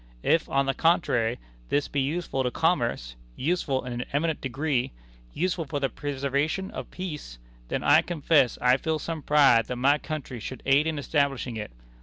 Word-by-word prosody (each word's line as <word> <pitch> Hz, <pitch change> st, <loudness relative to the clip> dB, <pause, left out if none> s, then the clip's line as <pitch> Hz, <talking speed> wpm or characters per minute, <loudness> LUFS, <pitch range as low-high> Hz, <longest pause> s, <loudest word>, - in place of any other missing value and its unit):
If, 165 Hz, -, +2 dB
on 135 Hz, 0 st, +2 dB
the 135 Hz, -, +1 dB
contrary, 125 Hz, -9 st, +2 dB, 0.3 s
this 145 Hz, 0 st, +1 dB
be 140 Hz, -, -1 dB
useful 145 Hz, 0 st, -1 dB
to 125 Hz, -, +1 dB
commerce -, -, 0 dB, 0.2 s
useful 140 Hz, -4 st, -1 dB
in 125 Hz, -, -4 dB
an 120 Hz, +1 st, -3 dB
eminent 155 Hz, +2 st, 0 dB
degree 135 Hz, -, -1 dB, 0.4 s
useful 175 Hz, -1 st, -1 dB
for 145 Hz, 0 st, -3 dB
the 135 Hz, -1 st, 0 dB
preservation 145 Hz, +7 st, -2 dB
of -, -, -7 dB
peace, 150 Hz, -, -6 dB, 0.3 s
then -, -, -2 dB
I -, -, +6 dB
confess 155 Hz, -6 st, +2 dB
I 125 Hz, +1 st, +5 dB
feel 160 Hz, +3 st, -1 dB
some 160 Hz, +1 st, -5 dB
pride 140 Hz, -6 st, +5 dB
that 125 Hz, -, -3 dB
my 140 Hz, +4 st, +3 dB
country 150 Hz, -7 st, -5 dB
should 125 Hz, +3 st, -7 dB
aid 140 Hz, +3 st, +4 dB
in 160 Hz, -1 st, -1 dB
establishing 140 Hz, -4 st, 0 dB
it. 105 Hz, -1 st, -5 dB
140 Hz, 175 wpm, -26 LUFS, 130-160 Hz, 0.4 s, I